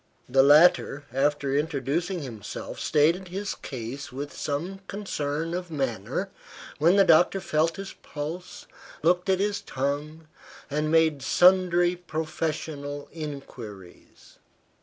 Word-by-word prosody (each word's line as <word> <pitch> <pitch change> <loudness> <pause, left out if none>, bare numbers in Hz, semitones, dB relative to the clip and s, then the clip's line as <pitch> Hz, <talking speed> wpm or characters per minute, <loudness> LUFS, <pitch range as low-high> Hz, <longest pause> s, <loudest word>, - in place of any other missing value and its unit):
The 135 +2 +5
latter, 145 0 +5
after 140 0 +1
introducing 155 +4 -1
himself, 115 -6 -7
stated 165 +5 +2
his 195 +3 -3
case 130 +1 -7
with 140 +3 -6
some 170 +7 -3
concern 165 -5 -3
of 180 0 -4
manner; 135 - -2 0.5
when 170 +5 +5
the 200 - +7
doctor 175 +2 +5
felt 160 -2 +1
his 195 0 -7
pulse, 160 +5 -6 0.4
looked 180 +3 +2
at 190 -1 +3
his 205 0 0
tongue, 145 +4 -3 0.4
and 150 +1 0
made 160 -3 +3
sundry 180 +2 +4
professional 155 -3 -4
inquiries. 125 - -10
155 Hz, 115 wpm, -26 LUFS, 140-175 Hz, 0.5 s, the